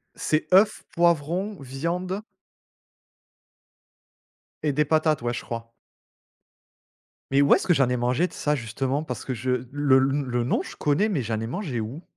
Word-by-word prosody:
c'est 155 0 -1
œuf, 205 +2 +4
poivron, 175 +3 +1
viande 175 +9 -3 2.4
et 150 - +1
des 150 +2 +2
patates, 155 -2 +2
ouais, 120 0 -1
je - - -4
crois. 115 0 -6 1.6
Mais 140 +1 +4
où 140 - +6
est-ce - - -1
que 175 - +6
j'en 135 -4 +3
ai 125 - 0
mangé 125 +8 +1
de - - -13
ça, 150 0 0
justement? 135 +5 -2
Parce 125 -5 -6
que 130 - -3
je 125 +1 -1
le 145 -2 +3
n 140 +2 +1
le 120 -2 -1
nom, 125 - +1
je - - -9
connais, 150 +9 +1
mais 170 -11 0
j'en 110 -1 -2
ai 115 - -3
mangé 135 - -3
où? 120 +10 -6
140 Hz, 170 wpm, -25 LUFS, 125-170 Hz, 2.4 s, où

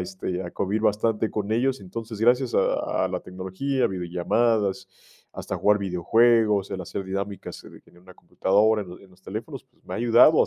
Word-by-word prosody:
este, 90 0 -4
a 85 - -6
covir, 100 +3 -1
bastante 110 +1 +1
con 105 -1 -3
ellos. 125 +1 +1
Entonces, 110 +3 -7
gracias 125 +2 +3
a - - +1
a - - -4
la - - -2
tecnología, 95 +9 -3
a - - +5
video 90 -2 -4
llamadas. 105 +3 +1 0.5
Hasta - - -5
jugar 105 0 +3
video 90 -3 -4
juegos, 110 -2 +4
el 95 - -4
hacer 95 +2 -5
dinámicas 100 +1 -5
en - - -14
en 85 - -21
una 90 +1 -16
computadora, 105 +5 +1
en 95 - -12
los 90 - -11
en 95 - -18
los 90 +1 -22
teléfonos. 115 +9 -7
Pues, 130 -2 -37
me - - -6
ha - - -3
ayudado, 120 +7 +6
a - - 0
105 Hz, 205 wpm, -25 LUFS, 95-115 Hz, 0.5 s, ayudado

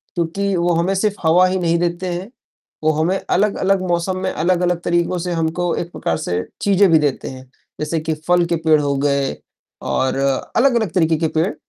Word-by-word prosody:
क्योंकि 190 +4 -1
वो 175 0 +1
हमें 195 +3 0
सिर्फ़ 205 +1 0
हवा 180 +3 +5
ही 185 0 -1
नहीं 170 -1 +1
देते 175 +1 -2
हैं, 190 +6 -6 0.5
वो 155 - +4
हमें 160 +5 0
अलग-अलग 195 -1 +1
मौसम 175 +2 0
में, 185 0 -2
अलग-अलग 175 +1 +1
तरीकों 175 +1 0
से 180 - -3
हमको 165 +1 -1
एक 170 - -4
प्रकार 80 - -2
से 90 0 -2 0.2
चीज़ें 200 -1 +4
भी 160 - +6
देते 145 -3 -1
हैं, 130 0 -10 0.3
जैसे 155 +2 -1
कि 160 0 -2
फल 175 -1 +4
के 170 - 0
पेड़ 155 -1 +5
हो 140 -1 0
गए, 140 -1 0 0.5
और 130 0 -1 0.4
अलग-अलग 235 - +2
तरीके 160 -3 +2
के 160 - 0
पेड़। 165 +6 +1
175 Hz, 190 wpm, -19 LUFS, 160-185 Hz, 0.5 s, भी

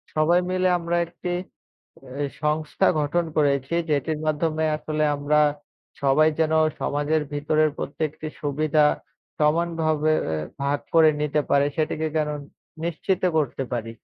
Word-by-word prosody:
সবাই 165 +3 +4
মিলে 185 0 +1
আমরা 170 0 -2
একটি 180 - -7 0.9
এ - - +1 0.2
সংস্থা 155 +5 +1
গঠন 165 +4 0
করেছি, 140 0 +1 0.2
যেটির 150 +1 0
মাধ্যমে 155 +1 0
আসলে 155 0 -1
আমরা 150 +1 +2 0.6
সবাই 150 +3 +4
যেনো 160 0 +3 0.2
সমাজের 145 +2 0
ভিতরের 155 +1 +2
প্রত্যেকটি 155 +2 -4
সুবিধা 150 +1 +1 0.6
সমানভাবে 155 0 +1 0.2
এ - - -2 0.2
ভাগ 140 +1 0
করে 160 -1 +7
নিতে 150 0 +1
পারে, 140 0 +4
সেটিকে 155 0 -1
কারন 150 -1 -1 0.5
নিশ্চিত 175 +2 -1 0.2
করতে 140 -2 -1
পারি। 115 -1 -3
155 Hz, 125 wpm, -24 LUFS, 145-160 Hz, 0.9 s, করে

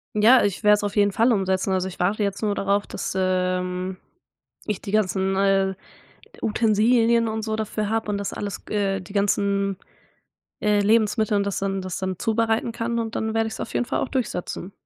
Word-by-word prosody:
Ja, 230 +5 +6
ich 200 +1 -1
werde 210 0 +7
es 210 - -1
auf 205 - -3
jeden 205 -1 +3
Fall 230 +4 +3
umsetzen. 190 -2 0
Also, 185 0 0
ich 185 - -11
warte 200 +4 +1
jetzt 200 +1 -2
nur 210 -2 +1
darauf 200 +1 0
dass, - - -4
ähm, 185 0 -1 0.7
ich 210 -3 -2
die - - -6
ganzen, 190 -2 +1
äh, 195 -1 +2 0.7
Utensilien 230 +2 +3
und 220 0 -3
so 220 0 -2
dafür 215 -1 -2
habe 225 -1 -1
und 200 - -1
das 200 - -4
alles 200 -1 -5
g - - -6
äh, 195 -2 0
die 185 +2 -12
ganzen, 200 -1 +1 0.8
äh, 210 -1 +2
Lebensmittel 215 0 +2
und 200 - +1
das 200 - -2
dann 195 -1 -2
das 185 -2 -4
dann 190 -2 -3
zubereiten 225 +1 0
kann 235 +1 -2
und 225 -1 -3
dann 220 0 -2
werde 225 0 +1
ich's - - -7
auf - - -5
jeden 245 - 0
Fall - - -1
auch - - -2
durchsetzen. 195 -6 -3
205 Hz, 200 wpm, -23 LUFS, 195-220 Hz, 0.8 s, werde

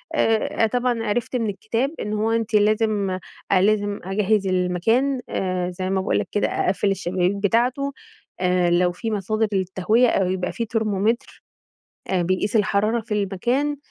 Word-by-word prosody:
آآ، 225 0 +2
طبعًا 245 0 0
آآ، - - -4
عرفت 240 +4 -1
من 230 -3 0
الكتاب 225 +7 -2
إن 210 - -3
هو 215 +1 0
أنتِ 225 -1 -1
لازم 210 -2 +2 0.3
لازم 205 +1 +2
أجهّز 200 +1 +1
المكان 190 +9 +1
آآ، 185 -1 -1
زي 185 +1 -4
ما 190 0 +1
باقول 190 - 0
لك - - -3
كده 205 - +1
أقفّل 195 +1 0
الشبابيك 185 0 0
بتاعته، 240 +7 +1 0.5
آآ، 180 -1 +2
لو 175 +1 +3
في 225 +5 -4
مصادر 215 +2 0
للتهوية 190 +6 +2
أو 190 -4 +1
يبقى 185 -1 -2
في 230 - -3
ترمومتر، 220 +2 -1 0.6
آآ، 185 -2 +1
بيقيس 185 +5 0
الحرارة 215 +2 +2
في 220 -1 -5
المكان، 240 +9 0
210 Hz, 155 wpm, -22 LUFS, 185-225 Hz, 0.6 s, لو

